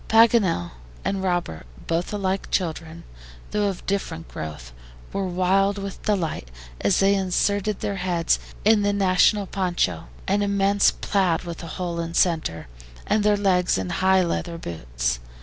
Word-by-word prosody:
Paganel 220 - +4 0.3
and 195 -1 -1
Robert, 175 - -2 0.2
both 165 +1 -1
alike 195 -2 -2
children, 165 -2 -2 0.5
though 210 -1 +1
of 195 -3 -4
different 170 -5 -3
growth, 75 -6 -7 0.4
were 195 -1 -1
wild 190 +3 +2
with 195 -1 -6
delight 170 - -1 0.3
as 195 - +2
they 195 +1 +4
inserted 200 +2 0
their 200 - -2
heads 175 -2 +1 0.3
in 215 0 +5
the 205 0 +1
national 200 +1 +3
PONCHO, 175 - -1 0.2
an 200 +1 +2
immense 200 0 +3
plaid 185 -5 0
with 170 -2 -7
a 170 - -7
hole 175 -2 -3
in 165 0 -4
center, 160 - +1 0.4
and 215 - +1
their 210 0 +3
legs 185 - +2
in 95 -1 -3
high 190 0 +3
leather 170 0 -2
boots. - - -3
185 Hz, 150 wpm, -24 LUFS, 165-200 Hz, 0.5 s, in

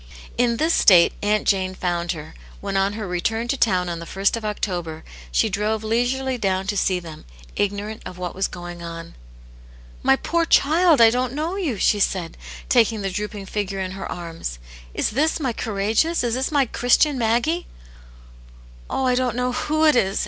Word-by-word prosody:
In 235 -1 +1
this 320 +5 +2
state 175 -4 +6
Aunt 210 0 +1
Jane 185 -2 +1
found 175 -1 -1
her, 155 -2 -9 0.3
when 195 - -4
on 195 +1 +2
her 210 -1 -5
return 225 +6 -1
to 275 - +2
town 185 -8 +1
on 170 -1 -4
the 170 +3 -9
ist 200 +3 +3
of 230 - -6
October, 175 -6 -3 0.3
she - - +2
drove 215 +1 -1
leisurely 245 +3 0
down 190 -2 0
to 205 +1 -2
see 185 -2 +1
them, 165 -3 -10 0.3
ignorant 205 +2 -2
of 180 - -9
what 180 -1 -4
was 190 +1 0
going 175 0 -8
on. 165 0 -8 0.9
"My 135 - +4
poor 335 - 0
child, 325 -2 +4
I 225 -1 +8
didn't 250 +1 -1
know 315 +6 -2
you!" 325 - -2
she 205 +2 +2
said, 180 -4 -1 0.3
taking 225 -4 +3
the 195 - -2
drooping 205 +1 -5
figure 195 -1 -3
in 185 -1 -3
her 195 +1 -6
arms. 165 - -6 0.2
" - - -19
Is - - 0
this 300 +9 +1
my 260 -6 -1
courageous, 225 +11 0
is 235 -2 0
this 260 +4 -1
my 285 -3 +3
Christian 255 +4 +2
Maggie 245 +10 +1
V^ - - -22 1.1
"Oh, 265 - -1
I 250 - +3
don't 250 -2 0
know 250 +1 0
who 310 +5 0
it 305 - +5
is!" 195 -4 +1
210 Hz, 190 wpm, -22 LUFS, 185-250 Hz, 1.1 s, I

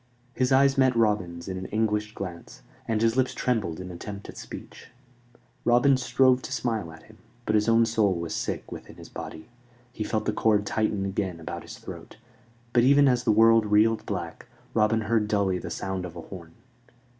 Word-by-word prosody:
His 130 0 0
eyes 135 +1 +4
met 130 -2 +4
Robin's 100 -7 0
in 95 -1 -4
an 95 - -6
anguished 105 0 -1
glance, 90 -3 -8 0.2
and 110 -1 0
his 115 +1 +2
lips 130 -1 +1
trembled 110 -10 -1
in 90 0 -7
attempt 100 +3 -8
at - - -9
speech. - - -10 0.8
Robin 125 +3 +4
strove 130 0 +3
to - - -8
smile 115 -9 -2
at 80 0 -14
him; - - -19 0.3
but 110 - 0
his 105 +1 +3
own 115 0 +5
soul 110 -4 +2
was 85 -1 -4
sick - - -4
within - - -9
his - - -12
body. 80 - -8 0.5
He 110 - -3
felt 110 0 -2
the 105 - 0
cord 105 -1 +2
tighten 105 -2 0
again 95 -3 -3
about 80 -2 -6
his - - -10
throat, - - -10 0.6
but 120 - +5
even 140 +3 +5
as 125 -1 +2
the 115 - +4
world 115 0 +5
reeled 110 +2 +3
black, 85 -5 -5 0.3
Robin 110 0 +2
heard 110 0 +1
dully 100 -3 +1
the - - -6
sound 95 -1 -4
of 90 -1 -7
a 85 - -7
horn. 85 -1 -11
105 Hz, 190 wpm, -26 LUFS, 95-115 Hz, 0.8 s, own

